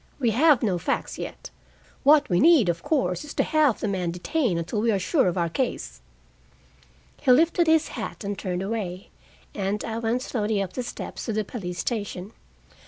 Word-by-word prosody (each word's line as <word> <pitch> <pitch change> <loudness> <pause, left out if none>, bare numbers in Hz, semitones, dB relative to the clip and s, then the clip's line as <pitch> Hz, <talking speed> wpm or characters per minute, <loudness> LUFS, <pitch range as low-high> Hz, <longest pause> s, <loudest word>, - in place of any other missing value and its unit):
We 240 -4 +2
have 285 +4 +4
no 190 -5 +1
facts - - -2
yet. - - -7 0.5
What 295 +1 +5
we 175 -2 +2
need, 300 - +6
of 170 0 -1
course, 260 - 0
is 300 - -9
to - - +2
have 305 -7 +2
the - - -2
man 185 -3 -1
detained 185 - -1
until 175 +6 -2
we 230 - +1
are 200 - +2
sure 265 - +2
of 180 - -1
our 170 -1 +1
case." 240 - -3 1.2
He 265 - +4
lifted 330 +5 +4
his 320 0 +3
hat - - -6
and 200 0 -3
turned 185 -1 -3
away, 195 -3 -4 0.4
and 200 +1 -2
I 225 0 -3
went 235 +2 -1
slowly 215 -5 -1
up 195 -2 -3
the 255 - -3
steps 240 - -6
to 225 - -2
the 215 0 0
police 180 -5 -6
station. 205 -3 -4
215 Hz, 190 wpm, -25 LUFS, 185-265 Hz, 1.2 s, need